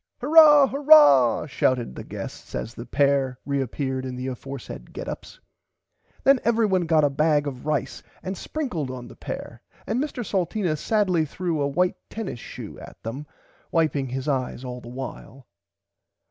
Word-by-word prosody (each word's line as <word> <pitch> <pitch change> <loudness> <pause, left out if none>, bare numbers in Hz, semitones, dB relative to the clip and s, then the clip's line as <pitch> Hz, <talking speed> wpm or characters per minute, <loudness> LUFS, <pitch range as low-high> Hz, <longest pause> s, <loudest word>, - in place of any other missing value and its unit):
Hurah 295 +1 +8
hurah 275 - +6
shouted 130 - 0
the - - -8
guests - - -8
as 115 - -4
the 120 - -9
pair 140 -2 +2
reappeard 135 -1 -2
in 130 -1 -5
the 125 +1 -5
aforesaid 130 - -8
get - - -6
ups. - - -8 0.8
Then 275 -1 +5
everybody 215 -6 +2
got 160 -2 +4
a 145 - +4
bag 150 +1 +2
of 135 0 -6
rice 145 -3 -1 0.2
and 190 +1 -4
sprinkled 180 - -4
on 125 -1 -7
the - - -13
pair - - -7 0.2
and 225 +5 -1
Mr 255 -6 -5
Salteena 185 -2 0
sadly 185 -1 +1
threw 165 0 -2
a 140 - +1
white 180 +6 +1
tennis 215 - -5
shoe - - -9
at - - -13
them 130 +7 -6 0.4
wiping 150 -5 +1
his 130 +2 -4
eyes 130 -3 -2
the 125 - -5
while. 125 +2 -8
145 Hz, 155 wpm, -24 LUFS, 130-190 Hz, 0.8 s, Hurah